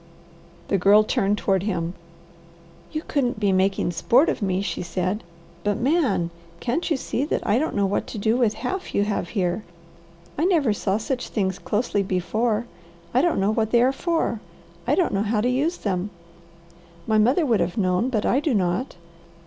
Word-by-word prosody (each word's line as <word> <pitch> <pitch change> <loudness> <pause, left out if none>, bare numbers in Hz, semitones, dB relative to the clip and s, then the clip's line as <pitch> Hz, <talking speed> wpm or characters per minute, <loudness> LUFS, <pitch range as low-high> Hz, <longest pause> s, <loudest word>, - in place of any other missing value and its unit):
The 195 - +2
Girl 205 +4 +6
turned 205 -1 +1
toward 195 -3 +1
him. 180 -4 -2 1.0
"You 310 0 -3
couldn't 250 -6 0
be 205 -2 +2
making 190 -1 +1
sport 250 - +3
of - - -2
me," 190 -1 0
she - - -3
said, 185 +4 -2 0.4
"but 205 -1 0
Man! 255 - +1 0.3
Can't 260 +10 -1
you 310 - +2
see 265 - -2
that - - -2
I 215 +3 +3
don't 315 - -2
know 200 -1 +2
what 195 +1 -1
to - - -7
do 220 +2 +1
with 235 -4 +2
half 375 +10 -4
you 200 - +3
have 205 -4 -2
here? 185 0 -1 0.8
I 320 - +2
never 315 - +3
saw 200 -1 0
such 250 +3 -3
things 190 -3 -1
closely 210 -1 0
before. 215 +5 0 0.5
I 255 - +4
don't 340 - +1
know 195 +2 +2
what 220 -1 0
they 235 +1 +4
are 260 - +4
for. 325 -5 -1 0.5
I - - +3
don't 360 - +1
know 195 - +1
how 215 +1 0
to 225 - +1
use 290 +8 0
them. 190 -1 -2 1.0
My 220 -1 +2
mother 255 +10 +3
would 230 -6 +2
have 175 +3 -1
known, 185 +4 +1
but 220 -5 -1
I 260 - +3
do 295 -4 0
not. 185 +6 0
215 Hz, 190 wpm, -24 LUFS, 195-255 Hz, 1.0 s, Girl